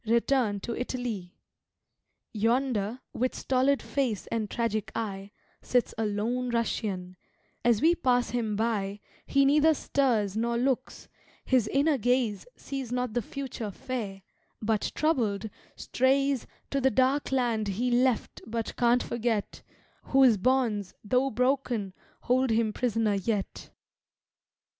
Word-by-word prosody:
return 235 -2 +2
to 230 +3 -4
Italy. 240 -8 -4 1.0
Yonder, 230 0 0
with 255 +1 -1
stolid 265 +2 +1
face 250 -8 -1
and 220 -3 -1
tragic 225 -3 -2
eye, 200 -3 -4 0.3
Sits 245 -1 +1
a 220 -1 -1
lone 235 +5 -1
Russian; 205 -6 -2 0.5
as 235 +1 +3
we 330 +2 +6
pass 250 -7 +1
him 225 -4 -1
by 205 -2 -1 0.3
He 275 0 +4
neither 300 +3 +5
stirs 230 -10 +1
nor 235 +1 0
looks; 255 +1 -1 0.4
his 255 -5 +3
inner 280 +4 +2
gaze 245 - +1
Sees 270 -4 -6
not 250 -2 -1
the 240 - +1
future 275 -6 -5
fair, 200 -3 -5 0.4
but, 215 -1 0
troubled, 220 -9 0 0.2
strays 270 0 +1 0.2
To 275 - 0
the 265 - +4
dark 265 +4 +1
land 235 -5 +1
he 235 +6 -1
left 245 -1 +1
but 225 0 -3
can't 245 0 +3
forget, 230 -3 -2 0.4
Whose 265 -4 +5
bonds, 225 -4 +1
though 255 +5 +2
broken, 250 -5 0 0.3
hold 255 +1 +2
him 225 -1 +1
prisoner 225 -3 +1
yet. 200 +1 -2
235 Hz, 125 wpm, -28 LUFS, 215-260 Hz, 1.0 s, we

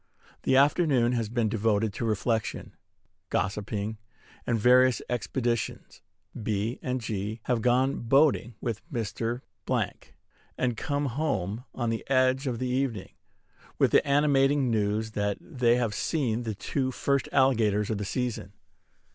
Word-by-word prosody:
The 130 - +2
afternoon 140 -4 +3
has 115 -4 -1
been 115 -1 0
devoted 110 -1 +1
to 115 - -3
reflection, 110 0 -1 0.5
gossiping, 105 +2 -2 0.5
and 115 - +2
various 125 +2 +5
expeditions. 120 -1 -2 0.4
B. 105 +2 -2
and 130 0 -2
G. 110 0 -4
have 120 -3 0
gone 125 +3 +2
boating 130 -1 +3
with 115 -3 -3
Mr.; 115 0 -3 1.2
and 125 -2 0
come 145 +4 -2
home, 120 - -2
on 120 -2 -1
the 115 - -3
edge 130 +1 +2
of 120 -2 -1
the 130 - -3
evening, 125 -6 -2 0.6
with - - +3
the - - +5
animating 140 -2 +3
news 110 0 0
that 105 -1 -1
they 125 -6 +1
have 120 -4 0
seen 120 -2 -1
the 110 -2 -3
two 130 +6 -2
first 140 +1 0
alligators 110 -6 +2
of 105 - -2
the - - -2
season. 110 -3 -3
120 Hz, 135 wpm, -27 LUFS, 110-130 Hz, 1.2 s, various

